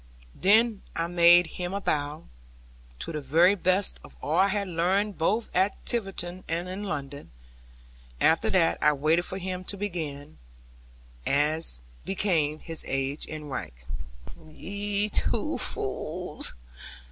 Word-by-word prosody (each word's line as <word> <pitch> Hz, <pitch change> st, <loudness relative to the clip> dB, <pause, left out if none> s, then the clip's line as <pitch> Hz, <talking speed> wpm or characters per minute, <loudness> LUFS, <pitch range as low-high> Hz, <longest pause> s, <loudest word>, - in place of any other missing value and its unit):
Then 215 Hz, +2 st, +4 dB
I 165 Hz, -, 0 dB
made 175 Hz, 0 st, +6 dB
him 180 Hz, +3 st, -4 dB
a -, -, 0 dB
bow, 150 Hz, -3 st, -1 dB, 0.7 s
to -, -, -5 dB
the 155 Hz, -2 st, -3 dB
very 165 Hz, +8 st, +5 dB
best 185 Hz, 0 st, +1 dB
of -, -, -13 dB
all 155 Hz, -, -1 dB
I 195 Hz, -, +6 dB
had 200 Hz, 0 st, -1 dB
learned 185 Hz, +4 st, +1 dB
both 215 Hz, +8 st, +1 dB
at 190 Hz, +3 st, +3 dB
Tiverton 185 Hz, -5 st, -2 dB
and 170 Hz, +2 st, -2 dB
in 185 Hz, +2 st, -5 dB
London; 145 Hz, -5 st, -5 dB, 0.9 s
after 165 Hz, +1 st, +4 dB
that 170 Hz, -3 st, +3 dB
I 150 Hz, -, +5 dB
waited 155 Hz, +5 st, +2 dB
for 190 Hz, -, -5 dB
him 185 Hz, -1 st, -4 dB
to 200 Hz, -, -5 dB
begin, 155 Hz, -7 st, -5 dB, 0.8 s
as 150 Hz, -, +1 dB, 0.2 s
became 170 Hz, -6 st, +1 dB
his 165 Hz, +1 st, -7 dB
age 135 Hz, +2 st, -2 dB
and 150 Hz, -2 st, -7 dB
rank 130 Hz, -, -4 dB, 0.6 s
in 160 Hz, -2 st, -17 dB
life. 155 Hz, -, -16 dB
'Ye 205 Hz, +1 st, -2 dB
two -, -, 0 dB
fools!' -, -, -3 dB
175 Hz, 140 wpm, -27 LUFS, 155-195 Hz, 0.9 s, made